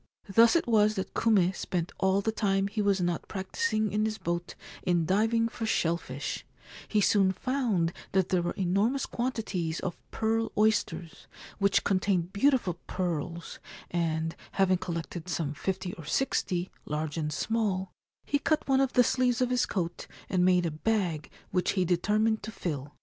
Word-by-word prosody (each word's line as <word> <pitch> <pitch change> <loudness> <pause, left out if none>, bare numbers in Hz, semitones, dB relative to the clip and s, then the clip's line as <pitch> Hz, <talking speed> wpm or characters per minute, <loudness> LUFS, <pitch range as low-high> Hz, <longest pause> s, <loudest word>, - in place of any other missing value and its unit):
Thus 225 - +5
it 335 - +3
was 215 -2 +3
that 190 - -4
Kume 195 -5 +3
spent 175 -3 -2
all 190 +1 +3
the 220 - 0
time 195 -3 +1
he 210 +1 -2
was 200 -1 +2
not 175 -1 -1
practising 215 +3 -1
in 210 +1 +1
his 220 0 -2
boat 170 -3 -3 0.3
in 175 -2 +1
diving 225 +5 +2
for 225 -1 -4
shell 170 -5 +2
fish; 140 -4 -5 0.4
he 215 - +1
soon 195 -1 +4
found 210 -6 0 0.2
that 190 -1 +2
there 180 -2 +2
were 175 - -2
enormous 200 +9 +1
quantities 210 -10 -2
of 175 - -3
pearl 225 +1 0
oysters, 210 -5 0 0.3
which 200 -1 +3
contained 185 -2 +1
beautiful 205 - +2
pearls; 170 -2 -3 0.3
and, 165 -1 -1 0.2
having 185 -2 +3
collected 170 -1 -5
some 160 -4 -1
fifty 190 +3 -3
or 165 - -10
sixty, 180 - 0 0.2
large 150 0 -2
and 155 -2 -2
small, 190 +2 -1 0.3
he 285 - +1
cut 310 +1 0
one 270 -1 +4
of 270 -1 +1
the 250 - +6
sleeves 250 0 +2
of 250 -1 +1
his 250 0 +2
coat 175 -3 -3 0.2
and 180 -1 +2
made 180 -1 +4
a 165 - -1
bag 170 -3 -1 0.2
which 180 -1 +1
he 185 -2 +1
determined 210 +5 +2
to - - -6
fill. 145 -7 -4
190 Hz, 165 wpm, -29 LUFS, 175-220 Hz, 0.4 s, the